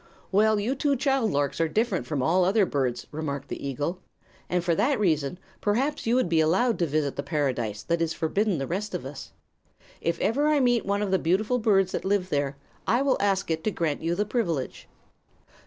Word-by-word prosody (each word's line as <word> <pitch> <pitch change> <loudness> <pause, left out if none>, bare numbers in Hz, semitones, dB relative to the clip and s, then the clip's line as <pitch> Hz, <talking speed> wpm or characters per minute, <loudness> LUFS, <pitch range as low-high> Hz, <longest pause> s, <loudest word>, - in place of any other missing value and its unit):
"Well, 215 +2 +4
you 225 +6 0
two 280 +1 +1
child 270 -3 +1
larks 145 +1 0
are 165 - +3
different 210 +1 0
from 145 -5 -1
all 180 +6 +3
other 195 +3 +3
birds," 125 -6 -1
remarked 145 -2 -4
the - - -6
eagle, 145 +7 -3 0.5
"and 180 -1 0
for 170 -1 +2
that 260 - +1
reason 160 -5 +1 0.2
perhaps 245 +7 0
you 235 - +3
would 255 - +2
be 165 -1 +2
allowed 190 +10 +2
to 170 - +2
visit 145 -1 -1
the - - 0
paradise 130 -8 -2
that 170 +6 0
is 165 -1 +1
forbidden 190 +4 0
the 135 - -2
rest 195 +5 -3
of 175 - -5
us. 135 +1 -8 0.7
If 170 - -1
ever 270 +9 +1
I 305 -1 +3
meet 245 -4 +2
one 200 +1 +1
of 200 - -2
the 190 - +3
beautiful 210 +9 +1
birds 195 -4 +3
that - - -3
live 190 -1 0
there, 145 -3 -1 0.3
I 240 +4 +3
will 275 -2 +2
ask 195 -3 +1
it 160 0 -1
to - - +3
grant 165 -7 -2
you 165 +1 0
the 205 +3 0
privilege." 175 - -2
180 Hz, 210 wpm, -26 LUFS, 155-215 Hz, 0.7 s, Well